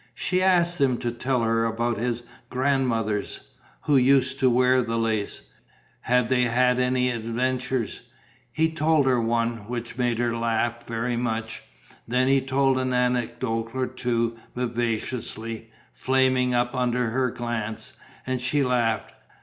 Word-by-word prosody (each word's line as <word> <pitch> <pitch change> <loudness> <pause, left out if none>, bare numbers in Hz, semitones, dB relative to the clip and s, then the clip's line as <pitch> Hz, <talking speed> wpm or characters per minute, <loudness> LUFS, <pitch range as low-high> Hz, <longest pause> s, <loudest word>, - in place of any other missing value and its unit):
She 180 +8 0
asked 175 -3 +3
him 130 -3 +3
to 120 0 -2
tell 125 +1 -1
her 115 0 +2
about 115 0 -1
his 120 0 -2 0.3
grandmothers, 125 -6 -1 0.3
who 145 -2 +3
used 135 +1 +3
to 130 -2 +4
wear 125 +1 +4
the 115 -1 -2
lace: 110 -2 -1 0.6
had 125 -1 +2
they 130 0 +2
had 125 +1 +2
any 125 0 +2
adventures? 125 +1 -2 0.5
He 160 0 +1
told 155 -2 +2
her 125 -2 +3
one, 115 -1 -1
which 120 +1 -5
made 120 -2 +1
her 120 0 0
laugh 115 0 -1
very 115 +1 -2
much; 110 -2 -3 0.5
then 125 +2 +2
he 135 0 +4
told 135 0 +2
an 130 0 -1
anecdote 120 -2 -1
or 130 -1 0
two, 115 -2 -2 0.2
vivaciously, 115 -1 -3 0.2
flaming 130 -1 +2
up 120 0 +1
under 125 -2 0
her 130 +1 +1
glance, 120 -2 -4 0.3
and 130 -1 -2
she 140 +3 +1
laughed. 120 -3 0
125 Hz, 140 wpm, -25 LUFS, 115-130 Hz, 0.6 s, to